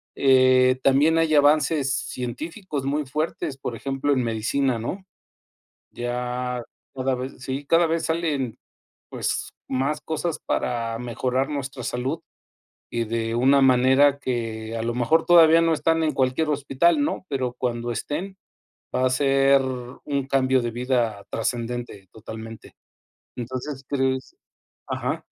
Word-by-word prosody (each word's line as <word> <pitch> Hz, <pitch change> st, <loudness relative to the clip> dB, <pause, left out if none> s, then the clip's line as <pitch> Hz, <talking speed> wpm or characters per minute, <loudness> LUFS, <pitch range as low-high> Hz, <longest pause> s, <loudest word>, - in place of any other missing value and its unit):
Eh, 130 Hz, -1 st, +5 dB
también 145 Hz, +4 st, +4 dB
hay 160 Hz, -1 st, +3 dB
avances 145 Hz, -1 st, +3 dB
científicos 145 Hz, -, -4 dB
muy 145 Hz, +2 st, 0 dB
fuertes. 150 Hz, 0 st, -3 dB
Por 125 Hz, -, -5 dB
ejemplo, 135 Hz, +3 st, -1 dB
en 130 Hz, -3 st, +1 dB
medicina, 115 Hz, +3 st, 0 dB
¿no? 185 Hz, -, -5 dB, 0.9 s
Ya 125 Hz, +1 st, -3 dB, 0.3 s
cada 130 Hz, 0 st, 0 dB
vez 130 Hz, +2 st, -5 dB
sí, 130 Hz, +2 st, -4 dB
cada 165 Hz, +2 st, +4 dB
vez 165 Hz, 0 st, -1 dB
salen, 155 Hz, -7 st, -1 dB, 0.5 s
pues -, -, -2 dB, 0.2 s
más 140 Hz, +4 st, -1 dB
cosas 160 Hz, +1 st, -3 dB
para 115 Hz, -2 st, -1 dB
mejorar 125 Hz, +3 st, -1 dB
nuestra 140 Hz, -3 st, -4 dB
salud 130 Hz, +7 st, -2 dB, 0.7 s
y 115 Hz, -1 st, -1 dB
de 115 Hz, 0 st, -2 dB
una 135 Hz, +3 st, +4 dB
manera 130 Hz, +2 st, +5 dB
que 115 Hz, -4 st, -3 dB
a 115 Hz, -, -3 dB
lo 120 Hz, +1 st, -1 dB
mejor 155 Hz, +7 st, +2 dB
todavía 165 Hz, -1 st, +7 dB
no 165 Hz, -1 st, +3 dB
están 165 Hz, +1 st, +1 dB
en 155 Hz, -1 st, +1 dB
cualquier 130 Hz, +4 st, +1 dB
hospital, 145 Hz, -, +2 dB
¿no? 290 Hz, -10 st, -2 dB
pero 130 Hz, -3 st, -1 dB
cuando 120 Hz, -1 st, -2 dB
estén 185 Hz, -, -4 dB, 0.6 s
va 130 Hz, -, +2 dB
a 130 Hz, -, +2 dB
ser 135 Hz, 0 st, +4 dB
un 130 Hz, +2 st, -4 dB
cambio 130 Hz, -1 st, +3 dB
de 120 Hz, -, -2 dB
vida 120 Hz, -4 st, -1 dB
trascendente 120 Hz, -3 st, -3 dB
totalmente. 110 Hz, 0 st, -10 dB, 0.6 s
Entonces, 130 Hz, +3 st, -5 dB
¿crees? 130 Hz, -2 st, -1 dB, 0.5 s
Ajá. -, -, -2 dB
130 Hz, 130 wpm, -24 LUFS, 125-145 Hz, 0.9 s, todavía